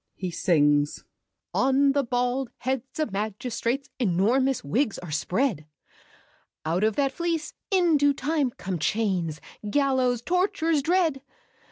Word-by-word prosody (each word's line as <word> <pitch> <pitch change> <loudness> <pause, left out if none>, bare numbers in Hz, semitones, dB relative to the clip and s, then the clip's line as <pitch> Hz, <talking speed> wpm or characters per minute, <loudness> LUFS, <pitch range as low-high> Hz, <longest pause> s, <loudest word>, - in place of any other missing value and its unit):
[He 185 -2 -4
sings. 145 -4 +2 0.5
"On 270 +1 +3
the 280 0 +1
bald 245 +1 -1
heads 260 +2 -3
of 310 - 0
magistrates, 230 +6 -2
Enormous 245 +6 +2
wigs 220 - 0
are 175 -3 -8
spread. 175 - -1 1.0
Out 170 +5 0
of 215 -1 +2
that 275 -1 +1
fleece, 335 +1 -2 0.2
in 350 -5 +4
due 285 0 +3
time, 290 0 0
come 190 -6 -5
Chains, 180 -5 0 0.3
gallows, 255 -2 +1
tortures 345 -3 +1
dread. 325 -3 +1
255 Hz, 125 wpm, -26 LUFS, 195-285 Hz, 1.0 s, in